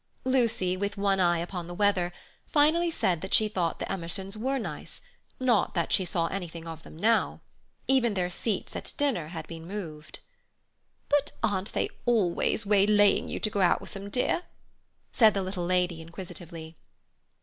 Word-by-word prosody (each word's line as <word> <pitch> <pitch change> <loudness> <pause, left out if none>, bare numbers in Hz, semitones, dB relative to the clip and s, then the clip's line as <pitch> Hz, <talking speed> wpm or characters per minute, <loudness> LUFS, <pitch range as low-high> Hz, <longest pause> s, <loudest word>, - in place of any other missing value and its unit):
Lucy, 230 -8 +2
with 200 +2 -3
one 195 -1 +2
eye 175 -2 +4
upon 175 0 -4
the 175 - -7
weather, 195 -3 +2 0.4
finally 320 +3 +4
said 180 - 0
that 190 - +1
she 215 - +4
thought 180 -5 -1
the - - -3
Emersons 190 +2 -2
were 260 +5 -1
nice; 235 - -6 0.4
not 245 -7 +2
that 170 -2 0
she 190 - +3
saw 175 -2 0
anything 170 -3 -5
of 165 -1 -7
them - - -13
now. 220 +5 +2 0.5
Even 240 -5 +3
their 180 -2 +1
seats 200 +4 -2
at - - -5
dinner 265 - 0
had 160 -1 -6
been 165 -1 -8
moved. 155 -6 -7 0.9
"But 290 -1 +1
aren't 205 -2 0
they - - +1 0.2
always 215 -1 +2
waylaying 205 0 +4
you - - -3
to 215 - 0
go 200 - 0
out 180 - +4
with - - -11
them, 195 0 -7
dear?" 250 +9 +1 0.7
said 220 -4 +5
the 195 - 0
little 185 -2 -3
lady 180 -2 +1
inquisitively. 165 -1 -9
195 Hz, 170 wpm, -28 LUFS, 175-215 Hz, 0.9 s, said